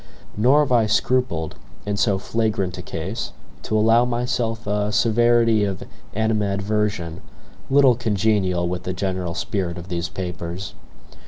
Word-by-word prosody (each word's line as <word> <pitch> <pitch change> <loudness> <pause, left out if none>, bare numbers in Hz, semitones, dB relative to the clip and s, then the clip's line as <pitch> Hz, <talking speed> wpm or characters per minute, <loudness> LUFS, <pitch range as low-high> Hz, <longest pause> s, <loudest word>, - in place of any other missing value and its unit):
Nor 130 +8 +5
have 145 - -1
I 115 -3 +4
scrupled, 105 -7 0 0.3
in 105 0 -1
so 100 -1 +2
flagrant 100 -3 -1
a - - -4
case, 95 +6 -5 0.3
to 110 - -1
allow 115 +2 +5
myself 120 -2 -1
a 105 0 0
severity 115 0 +3
of 95 -2 -2 0.3
animadversion 105 -4 -1 0.5
little 135 -2 +6
congenial 100 -6 +1
with 90 0 -3
the 90 +1 -4
general 90 -2 -2
spirit 90 -4 -2
of 85 +2 -8
these 85 -2 -2
papers. 90 +1 -5
105 Hz, 135 wpm, -22 LUFS, 90-115 Hz, 0.5 s, little